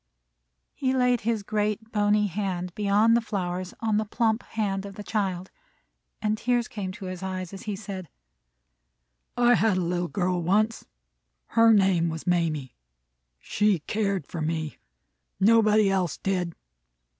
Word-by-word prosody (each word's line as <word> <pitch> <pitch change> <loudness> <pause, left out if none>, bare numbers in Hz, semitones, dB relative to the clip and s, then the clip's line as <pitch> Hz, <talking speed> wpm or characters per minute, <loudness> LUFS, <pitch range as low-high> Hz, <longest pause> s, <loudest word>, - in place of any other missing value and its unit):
He 260 -1 0
laid 250 -2 +2
his 225 -1 -1
great, 215 +1 -2
bony 210 0 +2
hand 180 -2 -3
beyond 210 +3 +3
the 235 - +3
flowers, 185 -4 -3
on 220 -2 +1
the 215 - 0
plump 225 +1 0
hand 195 -3 -2
of 200 -1 -8
the 210 - -7
child, 190 -4 -2 0.7
and 215 0 +2
tears 245 -1 +1
came 195 -4 -5
to 190 - -9
his 185 -1 -6
eyes, 185 -1 -4
as 195 - -9
he 205 - -1
said: 190 -4 -7 1.3
"I 245 0 +5
had 220 -5 +3
a - - +1
little 175 0 -1
girl 180 -1 -1
once. 215 +6 +1 0.6
Her 230 0 +5
name 190 -5 +3
was 160 -1 -6
Mamie. 160 -7 0 0.7
She 210 - +1
cared 200 -3 -1
for 165 - -6
me. 160 -1 -3 0.6
Nobody 215 -1 +5
else 185 -4 0
did. 180 -3 -2
200 Hz, 145 wpm, -26 LUFS, 180-215 Hz, 1.3 s, I